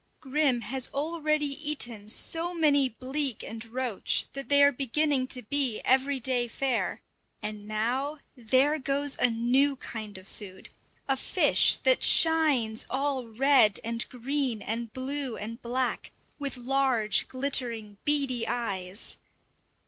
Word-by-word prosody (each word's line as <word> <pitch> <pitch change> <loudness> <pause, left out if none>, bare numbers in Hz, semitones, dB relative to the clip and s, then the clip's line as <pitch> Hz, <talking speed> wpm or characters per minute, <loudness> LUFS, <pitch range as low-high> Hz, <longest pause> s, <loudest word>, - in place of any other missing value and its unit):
Grim 270 -3 0
has 245 +4 -2
already 305 0 -1
eaten 275 -7 -2
so 330 +10 +1
many 285 -5 +3
bleak 260 +1 -2
and 225 0 -7
roach 240 -2 0
that 275 -3 -7
they 285 0 +6
are 285 - +6
beginning 275 +1 0
to 255 -1 0
be 260 -1 +2
everyday 260 -2 +1
fare; 260 +2 -2 0.4
and 210 -1 -6
now, 250 +8 -2 0.2
there 260 +5 +1
goes 280 +1 -1
a - - +3
new 250 +5 +1
kind 215 -5 -8
of 185 0 -14
food, 190 -3 -11 0.4
a 270 - +1
fish 265 - +4
that - - +4
shines 295 -9 +3
all 265 -1 -2
red 235 -2 +3
and 230 +1 -1
green 255 -3 -3
and 230 +1 -4
blue 265 -1 -4
and 230 +4 -8
black, 250 +1 -2 0.3
with 280 -2 -4
large, 250 -4 +1
glittering, 240 -6 -2
beady 275 -5 +1
eyes! 200 -4 -4
260 Hz, 130 wpm, -27 LUFS, 230-280 Hz, 0.4 s, they